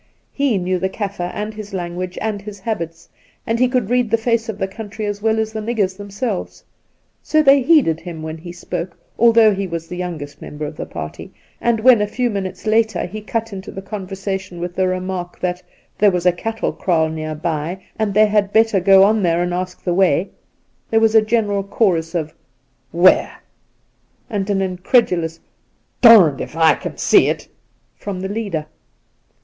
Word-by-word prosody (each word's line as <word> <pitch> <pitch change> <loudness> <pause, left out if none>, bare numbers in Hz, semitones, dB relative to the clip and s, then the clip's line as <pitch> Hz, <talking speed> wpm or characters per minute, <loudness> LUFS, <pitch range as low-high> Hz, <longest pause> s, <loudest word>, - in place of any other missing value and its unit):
He 275 -7 +1
knew 185 0 -1
the 190 +2 -1
Kaffir 195 -3 -4
and 210 +3 -5
his 210 -2 -8
language 180 0 -4
and 215 -2 -2
his 205 -1 -9
habits, 170 -6 -4 0.4
and 230 0 -1
he 255 - +4
could 250 -4 -1
read 245 -2 +2
the 230 - +3
face 230 0 0
of 215 - -4
the 195 - -1
country 215 +1 -7
as 205 0 -4
well 220 0 +1
as 220 0 -1
the 220 - -3
niggers 210 -4 -1
themselves, 205 +1 -5 0.6
so 310 0 +2
they 275 -1 +6
heeded 255 - +3
him 165 -3 -8
when 160 0 -5
he 175 +2 -9
spoke, 175 0 -6 0.2
although 230 -2 +6
he 195 0 -3
was 165 -1 -5
the 180 - -7
youngest 165 -5 -6
member 150 +1 -6
of 150 - -7
the - - -6
party, 75 0 -7 0.3
and 235 -2 +1
when 240 -2 +6
a 210 - +1
few 245 +3 -1
minutes 195 -1 -5
later 220 -3 +1
he 215 +4 -7
cut 225 +1 -3
into 190 +1 -7
the - - -7
conversation 190 -2 -5
with 175 0 -4
the 185 +1 +1
remark 185 -1 -4
that 180 0 -2 0.2
' - - -40
there 210 - +6
was 180 -2 -2
a 180 - +6
cattle 225 +5 -3
kraal 165 -4 +1
near 155 0 -4
by 160 +3 -3 0.2
and 215 -2 0
they 215 0 +6
had 205 -1 +1
better 220 -2 +3
go 195 +1 +6
on 215 +2 +3
there 170 -1 +2
and 175 0 -2
ask 180 0 -4
the 175 - 0
way,' 185 -1 +2 0.6
there 225 - +3
was 225 -1 +3
a 220 - +7
general 215 -2 0
chorus 185 -5 0
of 155 -2 -2 0.3
' 130 -1 -44
Where 185 - +5 0.5
?' - - -42
and 200 -2 -2
an 195 -1 +1
incredulous 180 -3 +1 0.3
' - - -45
Darned 205 - +7
if - - -7
I 160 -1 +5
can - - -7
see - - +4
it - - -2 0.3
!' - - -43
from 200 -3 -4
the 190 - -4
leader. 200 -8 -3
195 Hz, 200 wpm, -19 LUFS, 175-220 Hz, 0.6 s, a